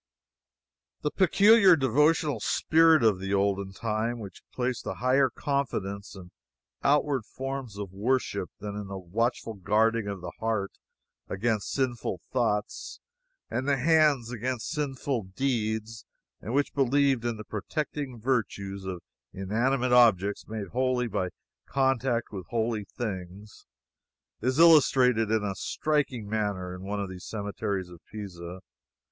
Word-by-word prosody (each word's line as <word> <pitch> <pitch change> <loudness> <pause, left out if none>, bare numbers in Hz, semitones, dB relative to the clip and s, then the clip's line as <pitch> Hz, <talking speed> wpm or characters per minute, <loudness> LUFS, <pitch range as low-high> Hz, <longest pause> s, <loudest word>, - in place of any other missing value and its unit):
The 150 - 0
peculiar 195 0 +6
devotional 150 0 +2
spirit 160 +3 +4
of 105 -5 +4
the 95 +1 -1
olden 100 -1 0
time, 110 +3 -2
which 100 -5 -9
placed 125 -1 -2
a 95 - -3
higher 130 +3 +3
confidence 105 -8 -3
in 90 -2 -11 0.5
outward 140 -3 +2
forms 135 -3 -6
of 100 -3 -5
worship 100 -4 -1
than 105 0 -5
in 105 -1 -5
the 95 0 -6
watchful 115 +5 -2
guarding 110 +2 +1
of 100 -2 -4
the 85 -1 -6
heart 110 -3 -1 0.6
against 110 +1 -1
sinful 120 -8 -1
thoughts 110 -5 -1 0.5
and 130 +2 -2
the 140 -1 +3
hands 145 -4 +3
against 125 0 -3
sinful 135 - -2
deeds, 110 -4 -1 0.4
and 115 - -4
which 145 0 +1
believed 135 -2 +2
in 120 -2 -2
the 105 - -7
protecting 135 - -4
virtues 100 -5 -2
of 90 -2 -5 0.3
inanimate 120 +7 0
objects 105 -5 +4
made 105 -3 -5
holy 125 +1 +1
by 95 -4 -1 0.4
contact 130 -3 +1
with 95 -4 -7
holy 115 -2 -1
things, 100 -2 -6 0.7
is 130 +4 0
illustrated 130 -8 +5
in 110 -1 +1
a 100 -1 -1
striking 135 -2 -1
manner 100 -4 -2
in 90 - -8
one 100 +2 -3
of 100 - -2
the 95 -1 -8
cemeteries 100 -2 -4
of 90 -1 -12
Pisa. 90 -4 -7
115 Hz, 135 wpm, -28 LUFS, 100-130 Hz, 0.7 s, peculiar